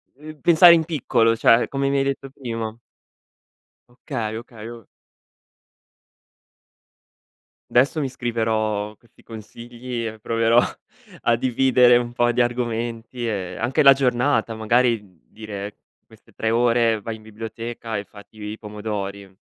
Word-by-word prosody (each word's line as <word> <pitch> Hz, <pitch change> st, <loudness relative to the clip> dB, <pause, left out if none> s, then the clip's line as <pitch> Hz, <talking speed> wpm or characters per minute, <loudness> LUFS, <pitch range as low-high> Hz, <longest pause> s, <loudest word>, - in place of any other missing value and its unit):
Uhm, 155 Hz, +2 st, -12 dB
pensare 170 Hz, +2 st, +8 dB
in 160 Hz, -2 st, +3 dB
piccolo, 115 Hz, -7 st, +1 dB
cioè 115 Hz, +1 st, +4 dB
come 135 Hz, 0 st, -1 dB
mi 140 Hz, -, +1 dB
hai 135 Hz, -, +2 dB
detto 135 Hz, 0 st, -3 dB
prima. 115 Hz, -5 st, -5 dB, 1.1 s
Okay, 120 Hz, -3 st, -5 dB
okay, 115 Hz, -1 st, -11 dB
o 115 Hz, -4 st, -11 dB, 2.9 s
Adesso 135 Hz, +6 st, +3 dB
mi 135 Hz, -3 st, -1 dB
scriverò 110 Hz, -4 st, -2 dB
questi 120 Hz, -, -25 dB
consigli 120 Hz, +2 st, -7 dB
e 110 Hz, 0 st, -8 dB
proverò 115 Hz, +2 st, +3 dB, 0.6 s
a 120 Hz, -, +3 dB
dividere 125 Hz, 0 st, +4 dB
un 120 Hz, 0 st, -3 dB
po' 120 Hz, 0 st, +2 dB
di 125 Hz, -, +1 dB
argomenti 120 Hz, 0 st, -3 dB
e 95 Hz, -5 st, -4 dB
anche 130 Hz, +6 st, +1 dB
la 135 Hz, 0 st, +9 dB
giornata. 125 Hz, -2 st, +1 dB
Magari 115 Hz, +1 st, +2 dB, 0.3 s
dire: 105 Hz, -2 st, -8 dB, 0.3 s
queste -, -, -21 dB
3 110 Hz, -, -1 dB
ore 115 Hz, -2 st, +2 dB
vai 110 Hz, +2 st, -5 dB
in 110 Hz, -, -18 dB
biblioteca 115 Hz, +1 st, -6 dB
e 100 Hz, -, -5 dB
fatti 105 Hz, +1 st, -15 dB
i 105 Hz, +1 st, -6 dB
pomodori. 100 Hz, -2 st, -6 dB
115 Hz, 130 wpm, -22 LUFS, 110-125 Hz, 2.9 s, la